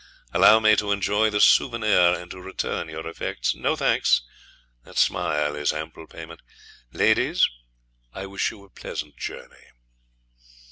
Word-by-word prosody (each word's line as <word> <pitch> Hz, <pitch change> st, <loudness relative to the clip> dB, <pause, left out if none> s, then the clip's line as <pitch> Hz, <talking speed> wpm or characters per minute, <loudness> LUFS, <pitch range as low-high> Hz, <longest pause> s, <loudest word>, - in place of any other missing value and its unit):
Allow 110 Hz, -, +6 dB
me 110 Hz, -1 st, +5 dB
to 105 Hz, -1 st, -1 dB
enjoy 100 Hz, +2 st, +1 dB
the 105 Hz, -1 st, -1 dB
souvenir 105 Hz, -8 st, +4 dB
and 90 Hz, -, -11 dB
to 95 Hz, -, -9 dB
return 95 Hz, -3 st, -4 dB
your 80 Hz, 0 st, -7 dB
effects. 85 Hz, -, -3 dB
No -, -, -1 dB
thanks; -, -, +2 dB, 0.6 s
that -, -, -13 dB
smile 75 Hz, -4 st, +1 dB
is 75 Hz, 0 st, -1 dB
ample 80 Hz, +1 st, -7 dB
payment. 85 Hz, 0 st, -11 dB, 0.5 s
Ladies, -, -, +2 dB, 0.6 s
I 95 Hz, -, -7 dB
wish 100 Hz, +1 st, -2 dB
you 100 Hz, -, -13 dB
a 100 Hz, -, -20 dB
pleasant 75 Hz, -4 st, -7 dB
journey.' -, -, -9 dB
90 Hz, 140 wpm, -24 LUFS, 80-105 Hz, 0.6 s, Allow